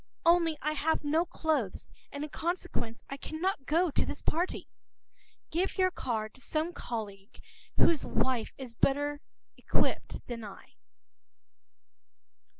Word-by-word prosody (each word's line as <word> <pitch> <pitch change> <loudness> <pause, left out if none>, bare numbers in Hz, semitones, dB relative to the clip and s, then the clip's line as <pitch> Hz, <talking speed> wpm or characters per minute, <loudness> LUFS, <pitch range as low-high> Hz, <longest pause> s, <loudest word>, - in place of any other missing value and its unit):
Only 335 -2 +5
I 305 - +3
have 310 +1 +1
no 315 +4 +3
clothes, 300 - 0 0.3
and 285 +1 -4
in 300 - -5
consequence 320 -9 -2
I 275 - -5
cannot 315 -1 -2
go 335 +2 +3
to - - +3
this - - -5
party. 345 +4 0 0.8
Give 355 +4 0
your 370 -1 +4
card 220 -9 -2
to 260 - -14
some 315 +5 0
colleague 205 -7 -5 0.4
whose 325 -4 +5
wife 255 -4 +1
has 255 -3 -7
a - - -37
better 290 +1 +2 0.5
outfit - - +2
than 235 -2 -5
I. 200 -2 -10
290 Hz, 135 wpm, -31 LUFS, 240-330 Hz, 0.8 s, Only